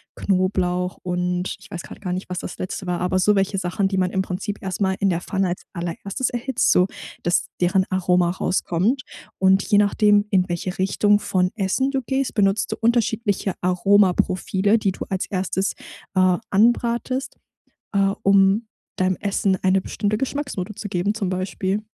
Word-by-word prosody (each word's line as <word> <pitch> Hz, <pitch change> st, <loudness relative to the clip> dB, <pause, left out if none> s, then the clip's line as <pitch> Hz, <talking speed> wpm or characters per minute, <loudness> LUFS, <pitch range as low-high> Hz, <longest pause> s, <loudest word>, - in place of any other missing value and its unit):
Knoblauch 185 Hz, -1 st, 0 dB
und 180 Hz, 0 st, -2 dB
ich -, -, -16 dB
weiß 175 Hz, -, -6 dB
grad -, -, -11 dB
gar 180 Hz, -3 st, -3 dB
nicht, 185 Hz, +1 st, -3 dB
was 180 Hz, 0 st, -4 dB
das -, -, -7 dB
Letzte 185 Hz, 0 st, -5 dB
war, 175 Hz, -1 st, -1 dB
aber 180 Hz, +1 st, +1 dB
so 205 Hz, +3 st, +4 dB
welche 195 Hz, 0 st, +1 dB
Sachen, 190 Hz, +2 st, 0 dB
die 190 Hz, -1 st, -2 dB
man 180 Hz, -1 st, +2 dB
im 190 Hz, 0 st, 0 dB
Prinzip 200 Hz, +3 st, -4 dB
erst 190 Hz, +1 st, -4 dB
mal 190 Hz, -1 st, +2 dB
in 195 Hz, -2 st, +2 dB
der 170 Hz, -, -1 dB
Pfanne 190 Hz, -1 st, -1 dB
als 175 Hz, -, -4 dB
allererstes 180 Hz, +7 st, -3 dB
erhitzt, 245 Hz, +1 st, +1 dB
so 180 Hz, +1 st, +4 dB, 0.3 s
dass 175 Hz, -, 0 dB
deren 185 Hz, +2 st, +3 dB
Aroma 180 Hz, -1 st, +2 dB
rauskommt. 190 Hz, +7 st, 0 dB, 0.3 s
Und 190 Hz, +1 st, +4 dB
je 205 Hz, -, +2 dB
nachdem, 205 Hz, 0 st, +4 dB
in 185 Hz, -2 st, +2 dB
welche 175 Hz, +2 st, -3 dB
Richtung 205 Hz, +2 st, +3 dB
von 180 Hz, -2 st, 0 dB
Essen 230 Hz, +6 st, 0 dB
du 270 Hz, -, -1 dB
gehst, 265 Hz, +1 st, -1 dB
benutzt 200 Hz, 0 st, +1 dB
du -, -, -1 dB
unterschiedliche 225 Hz, -4 st, +1 dB
Aromaprofile, 190 Hz, +2 st, +2 dB
die 195 Hz, -2 st, +1 dB
du -, -, -6 dB
als 190 Hz, -1 st, -2 dB
Erstes, 190 Hz, 0 st, -1 dB, 0.4 s
äh, 185 Hz, -1 st, +4 dB
anbrätst, 235 Hz, +4 st, +1 dB, 0.6 s
äh, 195 Hz, 0 st, +2 dB
um 195 Hz, +3 st, +4 dB, 0.3 s
deinem 185 Hz, 0 st, +1 dB
Essen 200 Hz, -1 st, 0 dB
eine 190 Hz, 0 st, +3 dB
bestimmte 210 Hz, +2 st, -2 dB
Geschmacksnote 270 Hz, -7 st, -3 dB
zu 205 Hz, -, -6 dB
geben, 190 Hz, +2 st, 0 dB
zum 215 Hz, -3 st, -2 dB
Beispiel. 190 Hz, +2 st, -2 dB
195 Hz, 170 wpm, -22 LUFS, 185-205 Hz, 0.6 s, so